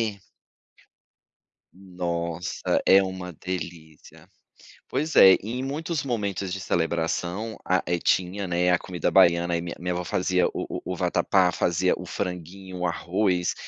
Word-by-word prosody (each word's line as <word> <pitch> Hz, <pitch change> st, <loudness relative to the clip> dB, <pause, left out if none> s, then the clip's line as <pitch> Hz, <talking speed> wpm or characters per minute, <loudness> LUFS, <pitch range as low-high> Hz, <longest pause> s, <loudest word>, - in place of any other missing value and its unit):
é -, -, -21 dB, 1.5 s
Nossa, 90 Hz, -2 st, -3 dB
é 95 Hz, +1 st, +7 dB
uma 95 Hz, -1 st, -5 dB
delícia. 85 Hz, -2 st, -8 dB, 0.6 s
Pois 155 Hz, +2 st, -2 dB
é, 95 Hz, -, +10 dB
em 115 Hz, +5 st, -4 dB
muitos 150 Hz, +3 st, -3 dB
momentos 100 Hz, -7 st, -2 dB
de 95 Hz, -, -3 dB
celebração 85 Hz, +5 st, -1 dB
a, 95 Hz, 0 st, +2 dB
eh, 85 Hz, 0 st, 0 dB
tinha, 95 Hz, +3 st, 0 dB
né, 90 Hz, +1 st, +2 dB
a 90 Hz, -, +3 dB
comida 90 Hz, -3 st, -2 dB
baiana 85 Hz, 0 st, +4 dB
e -, -, -3 dB
minha 85 Hz, 0 st, -6 dB
minha 90 Hz, +1 st, -3 dB
avó 90 Hz, 0 st, -3 dB
fazia 90 Hz, 0 st, +1 dB
o -, -, -4 dB
o -, -, -4 dB
o -, -, -4 dB
vatapá, 95 Hz, -2 st, +2 dB
fazia 90 Hz, +2 st, +1 dB
o 90 Hz, -, -8 dB
franguinho, 90 Hz, +1 st, -6 dB
o 90 Hz, -, -1 dB
arroz. 90 Hz, +1 st, 0 dB
90 Hz, 145 wpm, -25 LUFS, 85-95 Hz, 1.5 s, é